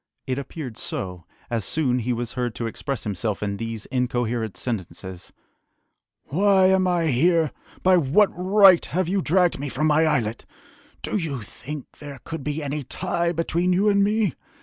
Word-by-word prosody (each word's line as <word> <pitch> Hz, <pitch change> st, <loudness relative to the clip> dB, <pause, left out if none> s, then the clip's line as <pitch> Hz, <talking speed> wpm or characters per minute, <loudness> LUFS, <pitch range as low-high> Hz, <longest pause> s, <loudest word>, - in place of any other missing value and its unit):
It 130 Hz, +1 st, -2 dB
appeared 135 Hz, -4 st, -7 dB
so, 90 Hz, -3 st, -4 dB, 0.3 s
as 115 Hz, -3 st, 0 dB
soon 130 Hz, +1 st, 0 dB
he 125 Hz, +1 st, -2 dB
was 120 Hz, -1 st, -2 dB
heard 125 Hz, -2 st, -3 dB
to 120 Hz, -, -3 dB
express 135 Hz, +4 st, -4 dB
himself 105 Hz, 0 st, -2 dB
in 100 Hz, -1 st, -2 dB
these 115 Hz, -1 st, -5 dB
incoherent 120 Hz, -4 st, -1 dB
sentences: 95 Hz, -5 st, -5 dB, 0.9 s
"Why 190 Hz, +4 st, +3 dB
am 190 Hz, -1 st, +3 dB
I 170 Hz, -3 st, +1 dB
here?... 165 Hz, +4 st, +3 dB, 0.3 s
By 185 Hz, 0 st, +5 dB
what 170 Hz, +7 st, +4 dB
right 190 Hz, 0 st, +6 dB
have 185 Hz, -1 st, -1 dB
you 195 Hz, +2 st, +1 dB
dragged 180 Hz, 0 st, +2 dB
me 145 Hz, 0 st, -3 dB
from 155 Hz, -, -1 dB
my 155 Hz, +1 st, +4 dB
islet?... 120 Hz, -7 st, -1 dB, 0.6 s
Do -, -, -1 dB
you 145 Hz, -, -3 dB
think 140 Hz, +6 st, -9 dB
there 145 Hz, -2 st, -8 dB
could 160 Hz, -4 st, -6 dB
be 150 Hz, +2 st, -3 dB
any 145 Hz, +1 st, -3 dB
tie 170 Hz, +5 st, -1 dB
between 170 Hz, +2 st, 0 dB
you 200 Hz, +4 st, +3 dB
and 200 Hz, -1 st, +4 dB
me?... 210 Hz, -, +1 dB
145 Hz, 170 wpm, -24 LUFS, 120-180 Hz, 0.9 s, right